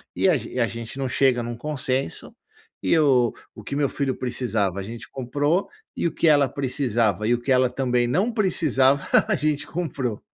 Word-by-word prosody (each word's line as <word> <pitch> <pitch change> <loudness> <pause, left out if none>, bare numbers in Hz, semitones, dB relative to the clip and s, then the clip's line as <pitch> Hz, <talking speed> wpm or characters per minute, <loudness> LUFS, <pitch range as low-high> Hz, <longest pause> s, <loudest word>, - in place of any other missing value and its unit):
E - - +2
a 170 - +4
ge 115 - -8
e 125 - -3
a 115 - +3
gente 115 +3 -7
não 135 -1 -2
chega 125 -1 +2
num 120 0 -5
consenso, 130 - -3 0.5
e - - +2
o 130 -6 +3 0.2
o - - -11
que 140 - -5
meu 140 -1 +1
filho 135 -2 -2
precisava, 115 -6 -1
a - - -4
gente 115 +3 -9
comprou, 145 +8 -1 0.3
e - - +1
o - - -4
que - - +1
ela 145 -2 +5
precisava 120 - 0
e 120 - +3
o 120 - -1
que 135 - -2
ela 130 -1 +4
também 125 -1 0
não 185 - +1
precisava 140 - +2 0.2
a - - +2
gente 150 -1 -1
comprou. 135 -10 -3
130 Hz, 205 wpm, -23 LUFS, 120-145 Hz, 0.5 s, ela